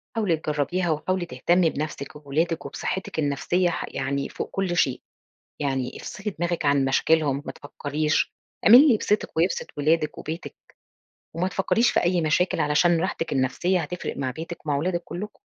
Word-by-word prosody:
حاولي 200 -8 +1
تجرّبيها، 155 +4 -1
وحاولي 175 +4 -1
تهتمي 175 0 +2
بنَفْسِك 150 -1 -5
وبولادِك 160 +4 -1
وبصحتِّك 190 -3 -4
النفسية 155 +5 +1
ح 170 - -3
يعني 140 +1 -2
فوق - - -5
كُلّ 190 -3 -1
شيء. 130 -6 +2 0.6
يعني 135 -3 -2
افصِلي 210 -1 -6
دماغك 175 -1 -1
عن 140 -1 +3
مشاكلهم، 140 +1 +2
ما - - -4
تفكّريش، 150 +2 -1 0.3
اعملي 240 +5 +10
اللي 290 -5 +5
يبسطِك 210 -3 -1
ويبسط 170 +4 +1
ولادِك 155 +2 +1
وبيتِك، 160 +3 -6 0.8
وما 175 +3 0
تفكّريش 225 +5 +2
في - - +2
أي 175 0 +2
مشاكل 165 +2 +1
علشان 160 +3 +3
راحتِك 165 -2 -2
النفسية 145 +8 +1
هتفرق 170 +3 -5
مع 130 -2 -2
بيتِك 160 +4 -8
ومع 145 -2 +1
ولادِك 175 +4 -1
كلّكم. 210 +4 -7
165 Hz, 155 wpm, -25 LUFS, 145-180 Hz, 0.8 s, اعملي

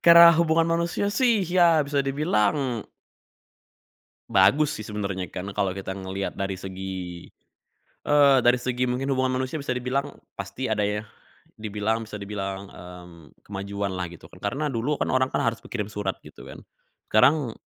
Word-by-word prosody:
Karena 170 0 +10
hubungan 165 0 +3
manusia, 170 +4 0
sih, 235 -5 +3
ya 175 -2 +4
bisa 140 0 0
dibilang 135 - 0 1.5
bagus, 120 +11 +4
sih, 110 - -7
sebenarnya, 100 -3 -3
karena 95 +2 -5
kalo 100 -3 0
kita 95 0 -5
ngelihat 95 +1 -4
dari 95 0 -2
segi, 95 -2 -6 0.8
eee, 145 -2 +6
dari 120 0 +4
segi 125 0 -1
mungkin 135 +3 -1
hubungan 130 -1 +1
manusia 130 +4 -3
bisa 130 -2 -2
dibilang 135 +3 -2 0.2
pasti 110 +5 -4
ada 105 -1 +1
ya, 105 +1 -2 0.5
dibilang 110 +1 -2
bisa 105 -1 -8
dibilang, 100 -1 -5
mmm, 90 -4 -13
kemajuan 100 0 -4
lah 90 - -2
gitu, 85 - -13
kan, - - -16
karena 130 +9 -1
dulu, 135 +3 -2
kan, - - 0
orang, 130 0 +1
kan, - - 0
harus 115 0 -1
berkirim 105 -1 -4
surat, 100 -2 -3
gitu - - -14
kan. - - -10 0.5
Sekarang 130 +2 +3
115 Hz, 155 wpm, -25 LUFS, 100-140 Hz, 1.5 s, Karena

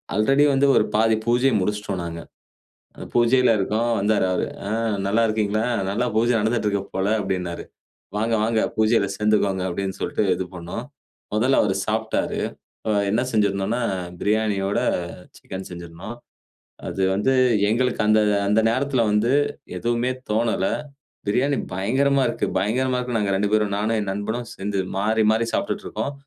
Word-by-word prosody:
Already 135 +7 +4
வந்து 140 +1 +3
ஒரு - - +4
பாதி 110 0 +4
பூஜைய 125 +2 +3
முடிச்சிட்டோம் 105 -2 -2
நாங்க. 85 0 -6 0.8
அ - - -6
பூஜையில 120 +1 +4
இருக்கோம். 110 +5 0
வந்தாரு 105 -1 +2
அவரு. 90 - 0 0.2
ஆ - - -3 0.4
நல்லா 110 +3 +2
இருக்கீங்களா? 110 +1 0 0.2
நல்லா 115 +5 0
பூஜை 120 +2 +3
நடந்துட்டு 110 -1 0
இருக்கு 100 -1 -1
போல 95 +2 +1
அப்டின்னாரு. 90 -3 -3 0.5
வாங்க, 115 +2 +1
வாங்க 110 -1 +1 0.2
பூஜையில 110 -2 +3
சேர்ந்துக்கோங்க 100 -3 +1
அப்டின்னு 95 +1 -3
சொல்ட்டு 105 - -1
இது 90 0 -4
பண்னோம். 85 0 -6 0.5
முதல்ல 125 +5 +3
அவர் 95 -2 +1
சாப்ட்டாரு. 110 +1 -1 0.5
அ - - +2 0.2
என்ன 110 +4 +2
செய்திருந்தோன்னா, 105 +2 +1 0.4
பிரியாணியோட 105 -2 +1 0.6
சிக்கன் 95 0 -8
செஞ்சிருந்தோம். 85 +6 -8 0.7
அது 95 - -3
வந்து 105 +7 +1 0.4
எங்களுக்கு 125 +3 +1
அந்த 110 0 +5 0.3
அந்த 105 +2 +4
நேரத்தில 130 0 0
வந்து 110 +5 +2 0.5
எதுவுமே 120 +1 0 0.2
தோணல. 110 -3 +1 0.6
பிரியாணி 135 +6 +2 0.2
பயங்கரமா 135 +8 +2
இருக்கு - - -1
பயங்கரமா 125 +5 0
இருக்கு. 125 -2 -2
நாங்க 100 -2 0
2 100 +1 0
பேரும் 105 -2 +1
நானும் 110 +2 0
என் 100 - -4
நண்பனும் 110 +4 -3
சேர்ந்து 100 0 -3 0.2
மாறி 110 +2 +2
மாறி 115 +1 +1
சாப்ட்டுட்டு 200 +1 -2
இருக்கோம். 140 - -3
110 Hz, 145 wpm, -23 LUFS, 100-120 Hz, 0.8 s, அந்த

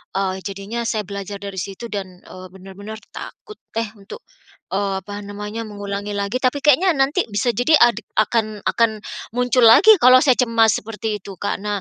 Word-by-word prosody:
eee, 190 -1 -1
jadinya 200 +4 -5
saya 215 -2 -1
belajar 200 0 -6
dari 200 -1 -7
situ 195 +5 -6
dan, 200 -2 -4 0.2
eee, 185 0 -11
benar-benar 195 +3 -10 0.2
takut, 425 - -10 0.2
eh, 230 - +1
untuk, 200 - -11 0.5
eee, 195 -1 -1
apa 205 +2 -7
namanya, 210 +2 -6
mengulangi 205 0 -5
lagi 200 +3 -2
tapi 260 +3 +1
kayaknya 310 +6 +5
nanti 275 +6 +1
bisa 205 +4 0
jadi 245 +6 +1
adik 235 -3 +4
akan 215 -1 0
akan 220 -2 +1 0.3
muncul 250 0 +2
lagi 415 - +8
kalau 255 +1 +8
saya 260 -3 +4
cemas 230 -3 +3
seperti 220 0 -4
itu 195 - -9
Kak. 205 - -2
Nah 205 -1 -2
210 Hz, 175 wpm, -20 LUFS, 200-240 Hz, 0.5 s, lagi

